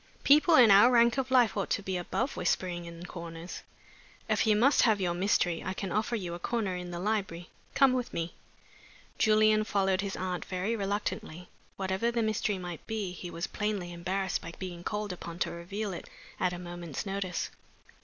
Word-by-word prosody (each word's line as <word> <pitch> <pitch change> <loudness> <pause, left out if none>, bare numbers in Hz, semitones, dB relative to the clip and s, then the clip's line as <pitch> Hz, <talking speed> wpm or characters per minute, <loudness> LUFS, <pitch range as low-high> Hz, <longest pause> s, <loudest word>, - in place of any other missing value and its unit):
People 305 +4 +6
in 240 -6 +8
our 205 +5 +8
rank 235 +1 +4
of 265 -1 -2
life 245 -5 +4
ought 200 - -1
to 205 - 0
be 190 -1 -2
above 180 +9 -2
whispering 175 -2 -1
in 170 +1 -9
corners. 170 -1 -7 0.7
If - - +1
you 215 - +5
must 255 +7 +4
have 220 -4 +4
your 180 -2 0
mystery, 175 -2 +1
I 190 - -3
can 195 -2 -4
offer 220 +4 0
you 180 -6 -4
a 175 - -6
corner 210 -3 -1
in 180 0 -5
the 175 - -5
library. 190 -4 -2 0.2
Come 270 -2 +5
with 250 -2 -2
me." 165 0 -3 0.9
Julian 215 0 +4
followed 195 -2 +1
his 200 -1 -3
aunt 185 -1 -3
very 190 +5 -2
reluctantly. 195 -4 -3 0.3
Whatever 190 +4 0
the 235 -1 0
mystery 215 -2 0
might 175 -3 -7
be, 215 -4 -2
he 180 0 -7
was 170 +1 -3
plainly 205 -4 -3
embarrassed 185 +2 -2
by 170 - -8
being 175 -2 -6
called 210 -1 -3
upon 170 -1 -8
to - - -1
reveal 195 +4 -4
it 170 - -8 0.3
at 180 - +2
a 180 - -5
moment's 175 -2 -6
notice. 195 -2 -3
190 Hz, 190 wpm, -30 LUFS, 175-215 Hz, 0.9 s, in